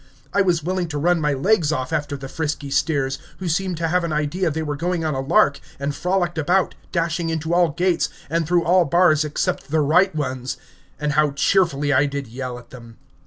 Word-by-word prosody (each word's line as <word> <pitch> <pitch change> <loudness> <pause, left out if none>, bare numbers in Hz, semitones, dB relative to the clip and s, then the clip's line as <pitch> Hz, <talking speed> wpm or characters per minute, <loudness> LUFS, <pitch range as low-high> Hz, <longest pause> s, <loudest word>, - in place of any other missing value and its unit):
I 200 - +3
was 175 -4 +1
willing 180 +1 -1
to 150 -2 -4
run 170 +3 +2
my 150 -1 +1
legs 160 +2 +2
off 130 0 -2
after 145 -2 -2
the 135 0 -7
frisky 145 -1 -4
steers, 135 -3 0 0.2
who 185 - -5
seemed 180 +1 -1
to 165 0 -1
have 180 +1 +1
an 170 - -2
idea 155 +4 0
they 160 +1 -3
were 150 -1 -3
going 170 +2 -2
on 155 - 0
a 135 - -2
lark, 145 0 +3 0.2
and 140 +1 -2
frolicked 175 0 -1
about, 180 +5 +1 0.2
dashing 165 0 -1
into 160 +1 -2
all 175 -1 +4
gates, 175 +3 0 0.2
and 165 +1 -1
through 175 0 +2
all 180 +2 +4
bars 155 0 +4
except 150 -1 -2
the 155 +1 +2
right 170 +5 +3
ones; 130 -4 -3 0.4
and 150 -1 -1
how 150 0 +3
cheerfully 145 -2 +2
I 140 +2 +3
did 140 0 -4
yell 125 +1 -6
at 125 - -15
them. 115 -2 -12
155 Hz, 215 wpm, -22 LUFS, 145-175 Hz, 0.4 s, all